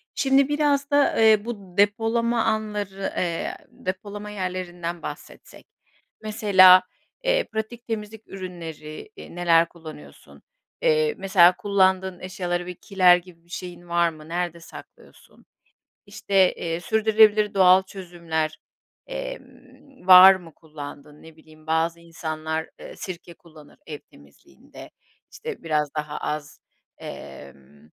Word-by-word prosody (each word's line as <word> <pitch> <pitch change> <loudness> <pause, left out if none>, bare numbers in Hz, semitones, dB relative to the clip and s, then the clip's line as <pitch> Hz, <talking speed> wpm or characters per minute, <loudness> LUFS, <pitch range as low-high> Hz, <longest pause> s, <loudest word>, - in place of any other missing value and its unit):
şimdi 270 0 +3
biraz 290 -1 0
da, 285 -1 +3
ııı, 220 -1 +4
bu 200 -6 -8
depolama 225 +3 +1
anları, 210 -3 -3
eee, 170 -2 -2
depolama 205 +2 -7
yerlerinden 180 -3 -5
bahsetsek. 150 - -10 0.5
Mesela, 190 -4 +6 0.4
ııı, - - +2
pratik 220 +2 -5
temizlik 220 -1 -6
ürünleri, 170 - -9
ııı, - - -11
neler 170 -1 +3
kullanıyorsun? 160 -3 -14 0.4
Iıı, 465 -2 +2
mesela 185 -2 +5
kullandığın 190 -2 +1
eşyaları 175 -1 -4
bir 180 - -7
kiler 180 -2 +4
gibi 170 -2 -15
bir - - -29
şeyin 175 0 -9
var 170 0 +2
mı? 155 -1 -13
Nerede 175 -1 -3
saklıyorsun? 165 - -16 0.6
İşte, 195 -2 +2
eee, 165 0 -4
sürdürülebilir 215 0 +3
doğal 185 0 +6
çözümler, 170 -5 -5 0.5
eee, - - -6 0.7
var 185 +1 +10
mı 175 -3 -11
kullandığın? 150 -1 -11
Ne 160 -1 -15
bileyim, 155 0 -20
bazı 165 +1 0
insanlar, 160 -1 -5
ııı, - - -10
sirke 175 -2 -8
kullanır 155 -4 -18
ev 150 -2 -7
temizliğinde. 70 0 -17 0.4
İşte - - -8
biraz 150 -3 -1
daha 150 0 -4
az, 150 0 -5 0.4
emm, 70 +2 -12
180 Hz, 120 wpm, -23 LUFS, 165-210 Hz, 0.7 s, var